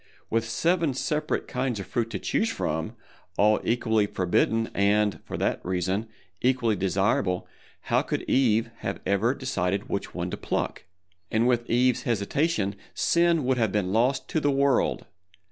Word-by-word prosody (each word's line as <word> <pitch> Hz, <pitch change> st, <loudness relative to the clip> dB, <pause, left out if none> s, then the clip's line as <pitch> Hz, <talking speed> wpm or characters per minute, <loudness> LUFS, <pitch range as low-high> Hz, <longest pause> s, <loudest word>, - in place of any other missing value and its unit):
With 115 Hz, 0 st, 0 dB
seven 165 Hz, 0 st, +1 dB
separate 150 Hz, +3 st, -1 dB
kinds 125 Hz, -3 st, -2 dB
of 95 Hz, -, -5 dB
fruit 115 Hz, +4 st, -2 dB
to -, -, -3 dB
choose 225 Hz, -, 0 dB
from, 80 Hz, -, -3 dB, 0.4 s
all 105 Hz, +1 st, +4 dB
equally 110 Hz, -3 st, +1 dB
forbidden 115 Hz, +5 st, +1 dB
and, 105 Hz, +1 st, +2 dB
for -, -, -5 dB
that -, -, -1 dB
reason, 95 Hz, +4 st, -1 dB, 0.3 s
equally 125 Hz, -3 st, +2 dB
desirable, 95 Hz, -1 st, 0 dB, 0.3 s
how -, -, +1 dB
could -, -, -3 dB
Eve 115 Hz, -3 st, +2 dB
ever 100 Hz, +4 st, 0 dB
have -, -, -13 dB
decided 100 Hz, -7 st, -1 dB
which -, -, -3 dB
one -, -, -3 dB
to -, -, -4 dB
pluck? -, -, -3 dB, 0.4 s
And 115 Hz, +2 st, +2 dB
with 120 Hz, -1 st, +1 dB
Eve's 125 Hz, +1 st, +3 dB
hesitation 110 Hz, -, 0 dB, 0.2 s
Sin 170 Hz, -4 st, +2 dB
would 130 Hz, -1 st, +1 dB
have 110 Hz, -4 st, +2 dB
been 95 Hz, -2 st, 0 dB
lost 130 Hz, +4 st, +1 dB
to 160 Hz, -, +1 dB
the 145 Hz, -, +1 dB
world! 140 Hz, -1 st, +2 dB
115 Hz, 155 wpm, -26 LUFS, 100-130 Hz, 0.4 s, all